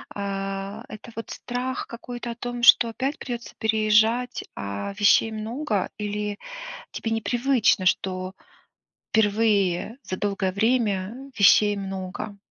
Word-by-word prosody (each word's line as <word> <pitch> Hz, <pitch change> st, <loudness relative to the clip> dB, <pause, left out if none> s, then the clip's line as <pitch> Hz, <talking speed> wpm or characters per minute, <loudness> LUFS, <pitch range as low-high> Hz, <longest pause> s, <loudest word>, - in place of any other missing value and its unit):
Э, 195 Hz, +1 st, -4 dB
это 215 Hz, +2 st, -10 dB
вот 225 Hz, -, -6 dB
страх 255 Hz, +1 st, -4 dB
какой-то 240 Hz, 0 st, -6 dB
о -, -, -6 dB
том, 245 Hz, 0 st, -5 dB
что 235 Hz, 0 st, +8 dB
опять 270 Hz, +6 st, -2 dB
придётся 240 Hz, -2 st, -6 dB
переезжать, 220 Hz, +3 st, +2 dB
а 100 Hz, -, -4 dB
вещей 210 Hz, +1 st, +5 dB
много, 220 Hz, -1 st, -2 dB
или 210 Hz, -1 st, -3 dB, 0.5 s
тебе 225 Hz, -, -3 dB
непривычно, 230 Hz, -2 st, +2 dB
что 185 Hz, 0 st, 0 dB, 0.8 s
впервые 210 Hz, -2 st, +2 dB
за 185 Hz, -, -4 dB
долгое 195 Hz, -2 st, -1 dB
время 225 Hz, +3 st, 0 dB
вещей 205 Hz, +1 st, +6 dB
много? 195 Hz, +1 st, -5 dB
215 Hz, 115 wpm, -25 LUFS, 195-235 Hz, 0.8 s, что